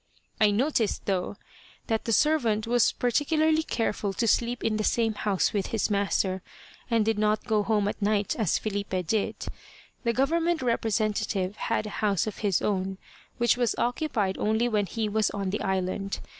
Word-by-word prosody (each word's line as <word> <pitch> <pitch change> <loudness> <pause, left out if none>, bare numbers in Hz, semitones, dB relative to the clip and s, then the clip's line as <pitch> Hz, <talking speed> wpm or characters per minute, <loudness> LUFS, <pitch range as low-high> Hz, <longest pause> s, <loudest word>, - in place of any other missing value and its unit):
I 215 - +5
noticed, 225 0 0
though, 190 0 -1 0.5
that 225 -2 -1
the 230 - -1
servant 230 -6 +2
was 240 0 +3
particularly 310 +5 +2
careful 215 -8 -2
to 230 - -1
sleep 240 +2 +1
in 215 -1 +1
the 215 - -1
same 225 0 +1
house 205 -2 0
with 200 -3 -1
his 220 -1 -1
master, 195 -2 0 0.5
and 230 -3 +2
did 220 -1 +1
not 215 0 +1
go 220 -3 +2
home 210 -1 +1
at 205 - -4
night, 205 -1 +1
as 215 -8 +1
Filipe 200 -3 -3
did. 210 +5 0 0.7
The 235 - +2
government 325 +5 +1
representative 215 -4 0
had 230 -1 -1
a - - -4
house 200 -4 +2
of 215 - -5
his 200 -4 +1
own, 190 -1 -1 0.4
which 240 0 +3
was 240 -3 +1
occupied 235 -6 -1
only 220 +3 +1
when 210 -4 0
he 220 +4 -2
was 215 +1 +1
on 195 -2 -3
the 210 - -2
island. 190 +1 -2
215 Hz, 170 wpm, -27 LUFS, 200-235 Hz, 0.7 s, I